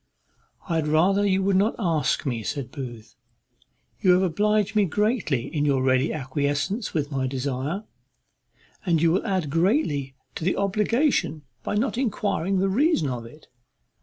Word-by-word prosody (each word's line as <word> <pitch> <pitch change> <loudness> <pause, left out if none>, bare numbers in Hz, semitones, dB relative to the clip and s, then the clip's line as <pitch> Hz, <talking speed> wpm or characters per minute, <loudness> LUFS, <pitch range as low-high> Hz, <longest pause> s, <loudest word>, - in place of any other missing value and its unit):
"I 170 -3 0
had 155 -2 0
rather 190 +7 +3
you 190 0 +2
would 195 -1 +3
not 205 +4 +2
ask 165 - 0
me," 120 -5 -2
said 130 +3 -4
Booth. 120 -6 -8 0.9
"You 185 - +5
have 180 +1 +3
obliged 210 +4 +1
me 210 -1 +4
greatly 205 - 0
in 150 -2 -2
your 140 -3 +2
ready 130 +2 +2
acquiescence 145 - -2
with 150 -1 -1
my 135 -1 -1
desire, 135 - -3 1.0
and 170 -4 +2
you 165 +1 +3
will 190 +7 0
add 185 -8 -1
greatly 165 - +1 0.2
to - - -6
the 185 - +1
obligation 210 - +1 0.2
by - - -3
not 235 +3 0
enquiring 200 -6 0
the 190 +1 +2
reason 215 - +2
of 120 -2 -5
it. 150 +7 -16
165 Hz, 160 wpm, -25 LUFS, 140-200 Hz, 1.0 s, You